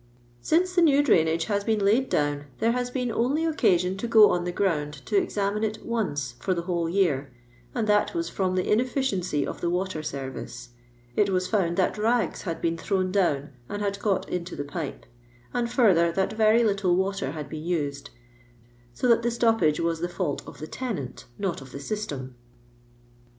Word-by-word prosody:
Since 360 - +2
the 360 - +4
new 290 -3 +5
drainage 165 - +3
has 205 -2 0
been 220 0 +1
laid 215 +6 +2
down 145 -1 0
there 230 - +2
has 245 0 -1
been 250 -1 -2
only 270 +9 +1
occasion 185 - +2
to 235 - -3
go 220 -2 +7
on 175 -1 0
the 180 - -1
ground 160 -6 0
to - - -2
examine 210 - 0
it 215 0 -3
once 150 - -2
for 185 - 0
the 170 - -3
whole 170 -2 -1
year, 160 -8 +1 0.4
and 225 - 0
that 210 +8 +2
was 335 0 -1
from 185 -1 -1
the 185 - +1
inefikiency 210 - 0
of - - -6
the 170 - 0
water 180 -2 -1
service. 130 -4 -6 0.5
It 205 -1 +3
waa 185 - +3
found 185 -3 0
that 190 +2 +1
lags 230 +2 +1
had 165 -3 -5
been 165 0 0
thrown 185 -1 0
down 150 -8 +1 0.2
and 205 - -4
had 200 -1 -2
got 205 -2 0
into 180 0 -4
the 145 - -3
pipe; 145 0 -5 0.5
and 235 -1 -1
further, 185 -10 +4
that 190 +4 0
very 220 +1 +4
little 195 -4 +2
water 190 -7 -1
had 150 -3 -6
been 155 +1 -7
used, 145 -5 -2 0.9
so 250 - 0
that 235 -1 +5
the 235 - +1
stoppage 225 -10 +2
waa 170 0 +1
the 165 +2 -3
fisult 160 -5 -2
of - - -10
the 155 - -6
tenant, 155 - -5
not 190 -7 -2
of 130 -1 -12
the 140 - -7
system.' 140 -7 -4
190 Hz, 190 wpm, -26 LUFS, 165-225 Hz, 0.9 s, go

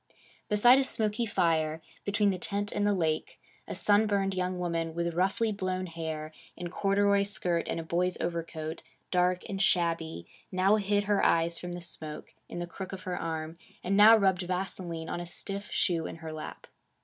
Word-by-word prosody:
Beside 240 +5 +6
a - - +3
smoky 225 -2 0
fire, 160 -5 +1 0.3
between 205 0 +2
the 185 - -3
tent 205 +2 -2
and 205 0 +1
the 205 - +3
lake, 160 -4 -1 0.3
a - - -5
sunburned 205 -2 +3
young 185 0 -1
woman 165 -2 -2
with 170 0 -1
roughly 195 +6 +1
blown 185 -2 -2
hair, 160 -2 -5 0.3
in 175 -1 -5
corduroy 200 +1 +3
skirt 190 -4 0
and - - -2
a - - -4
boy's 180 +2 0
overcoat, 165 -1 -4 0.3
dark 180 0 +1
and 195 -1 -3
shabby, 165 - +1 0.3
now 190 +3 +4
hid 205 0 +1
her 205 0 +1
eyes 170 0 +2
from 175 0 -6
the 175 - -6
smoke, 155 -3 -7 0.2
in - - -6
the 175 - -2
crook 190 +2 -7
of 185 - -7
her 180 -1 -3
arm, 160 -2 -3 0.3
and 195 +2 +1
now 215 +3 +9
rubbed 190 -3 +2
vaseline 180 -2 -3
on - - -3
a 175 - -5
stiff 200 +3 -5
shoe 165 -3 0
in - - -7
her 160 -1 -7
lap. 155 0 -8
180 Hz, 185 wpm, -29 LUFS, 165-200 Hz, 0.3 s, now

